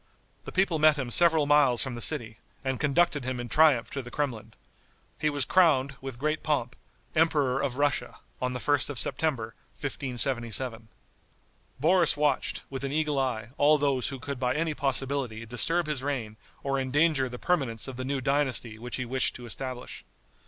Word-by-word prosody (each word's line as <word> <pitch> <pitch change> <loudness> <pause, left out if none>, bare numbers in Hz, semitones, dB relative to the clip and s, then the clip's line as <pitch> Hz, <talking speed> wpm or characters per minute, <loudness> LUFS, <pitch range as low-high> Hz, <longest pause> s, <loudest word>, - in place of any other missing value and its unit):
The - - -6
people 185 -4 +1
met 155 0 +6
him 130 -4 -3
several 165 0 +5
miles 145 -5 +4
from 130 -2 -4
the 120 - -6
city, 115 -7 -1 0.3
and 130 -1 -1
conducted 150 0 +2
him 130 0 -3
in 120 - -4
triumph 150 -6 +4
to 140 - -3
the 125 - -10
Kremlin. 115 -6 -4 0.6
He 155 - +1
was 145 -2 -1
crowned, 145 -7 +3
with 135 -2 -6
great 155 +4 -1
pomp, 135 -6 -1 0.4
Emperor 145 -5 +2
of 130 -2 -2
Russia, 145 -1 0 0.2
on 125 0 -1
the 125 - -3
1st 145 +1 +1
of 145 - -4
September, 130 -6 -1 0.3
1577. 120 -4 -2 0.9
Boris 165 0 +4
watched, 145 -2 0
with 135 0 -6
an 135 - -2
eagle 150 -1 0
eye, 120 -4 -2
all 150 +1 +5
those 140 -3 +1
who 135 - -4
could 135 +1 -5
by 125 -1 0
any 160 0 0
possibility 135 -4 -2
disturb 165 +9 +1
his 150 -4 -2
reign 125 -6 -3 0.3
or 135 -1 0
endanger 135 0 +2
the 125 - -7
permanence 135 -9 -1
of 135 - -6
the 130 - -5
new 135 +1 -2
dynasty 130 -5 0
which 120 +1 -5
he 125 - -3
wished 130 +2 0
to 120 - -9
establish. 125 +4 -5
135 Hz, 180 wpm, -28 LUFS, 125-150 Hz, 0.9 s, met